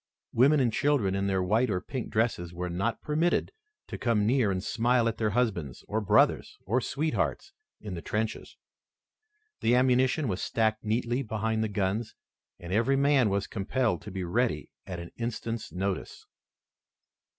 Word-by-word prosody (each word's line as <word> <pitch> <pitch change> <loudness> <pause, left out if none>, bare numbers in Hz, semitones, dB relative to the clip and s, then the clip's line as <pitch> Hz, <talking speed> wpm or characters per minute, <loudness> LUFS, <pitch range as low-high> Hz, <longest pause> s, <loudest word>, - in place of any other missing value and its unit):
Women 140 +6 +5
and 120 -4 +1
girls 135 -10 +2
in 100 0 0
their 95 -1 +1
white 110 +7 +2
or 90 -3 0
pink 125 +5 -5
dresses 110 -6 0
were 90 0 -3
not 100 +7 -2
permitted 160 +3 +1 0.3
to - - -7
come 115 -4 +2
near 120 -1 +3
and 95 -1 -1
smile 120 +2 +2
at 115 - -2
their 110 -1 +2
husbands 100 - -1
or 110 +2 -1
brothers 105 - +3
or 120 +7 +1
sweethearts 155 - -2 0.3
in 105 -3 -7
the 85 - -5
trenches. 110 +4 -3 1.0
The 120 - +3
ammunition 130 +4 +3
was 95 -3 -2
stacked 110 -1 0
neatly 120 +3 0
behind 110 -1 -1
the 110 - -1
guns, 105 +3 -1 0.4
and 85 +1 -6
every 115 +6 +3
man 140 -4 +4
was 100 0 0
compelled 115 +4 -1
to - - -8
be 95 -1 -4
ready 90 -3 -1 0.2
at 90 -2 -5
an 85 - -8
instant's 115 -1 -4
notice. 95 +1 -4
110 Hz, 160 wpm, -28 LUFS, 100-125 Hz, 1.0 s, Women